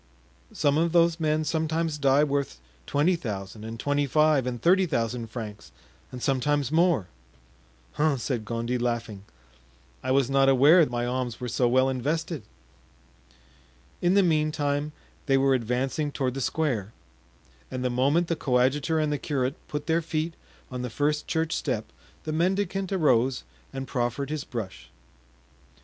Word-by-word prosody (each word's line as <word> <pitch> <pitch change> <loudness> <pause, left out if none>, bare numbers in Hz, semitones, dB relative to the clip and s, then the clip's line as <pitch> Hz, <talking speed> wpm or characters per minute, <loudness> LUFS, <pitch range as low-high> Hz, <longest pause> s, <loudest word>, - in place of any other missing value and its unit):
"Some 145 0 +1
of 165 0 +1
those 170 -1 +4
men 155 -1 +1
sometimes 160 -1 -1
die 140 +1 +4
worth 140 - -1 0.3
twenty 155 +6 +2
thousand 105 - -6
and 115 0 -7
twenty 145 0 0
five 150 -2 +3
and 120 -1 -3
thirty 185 - +4
thousand 115 -4 -2
francs 110 -2 -8 0.4
and 125 -1 -7
sometimes 140 +1 +1
more." 165 - +3 0.8
"Hum!" 150 -2 +1
said 120 -1 -2
Gondy, 115 +2 -2
laughing; 115 -4 -3 0.8
"I - - -4
was 135 -1 +3
not 135 0 +3
aware 145 +7 +6
my 120 0 -2
alms 125 -1 -3
were 125 - -4
so 120 +1 +1
well 130 +2 +3
invested." 150 +5 -2 1.6
In 175 +2 +3
the 200 - +5
meantime 150 -3 0 0.4
they 135 -1 +4
were 135 0 +3
advancing 130 +5 -1
toward 130 -3 -1
the 135 - -4
square, 120 -6 -1 0.8
and 130 0 -4
the 125 - +1
moment 140 +8 +2
the 165 - 0
coadjutor 135 +4 +1
and 155 -1 +1
the 145 - -2
curate 135 -3 -1
put 150 0 -4
their 165 +1 +1
feet 160 0 -2 0.4
on 125 -1 -4
the 125 - -3
first 150 +5 -1
church 160 -1 0
step 115 -7 -2 0.4
the 155 - -3
mendicant 190 +3 0
arose 130 - +2 0.3
and 135 0 -5
proffered 125 +3 -2
his 155 -2 -3
brush. 95 - -6
140 Hz, 150 wpm, -26 LUFS, 125-155 Hz, 1.6 s, aware